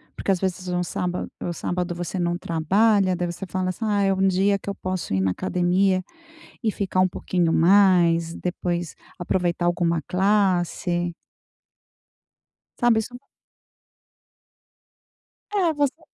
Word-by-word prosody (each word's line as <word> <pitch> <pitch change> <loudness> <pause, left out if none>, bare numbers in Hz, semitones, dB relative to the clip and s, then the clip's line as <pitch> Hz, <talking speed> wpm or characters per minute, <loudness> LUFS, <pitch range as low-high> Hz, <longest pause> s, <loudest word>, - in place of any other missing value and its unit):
Porque 195 - -1
às 185 - +1
vezes 185 -1 -3
um 180 0 -1
sábado 180 0 -3
o 175 - -3
sábado 175 +1 -3
você 175 +2 -4
não 175 0 0
trabalha, 185 +4 +2
daí 175 0 -2
você 195 +3 -7
fala: 185 0 -1
"Ah, 210 -2 +1
é 195 - +3
um 190 0 +2
dia 195 +2 +2
que - - -7
eu 200 - -3
posso 185 - -4
ir 95 - +1
na 95 -1 +1
academia, 185 - +1 0.6
e 220 - +2
ficar 190 -2 -2
um 185 - +5
pouquinho 175 -2 -1
mais, 170 -2 +4
depois 175 -1 -3 0.2
aproveitar 175 -1 -1
alguma 170 -2 +1
classe.". 180 -3 +1 1.7
Sabe 240 -3 +4
isso 245 +3 -6 2.4
É, 360 -6 +2
você 290 +1 -1
185 Hz, 135 wpm, -23 LUFS, 175-195 Hz, 2.4 s, um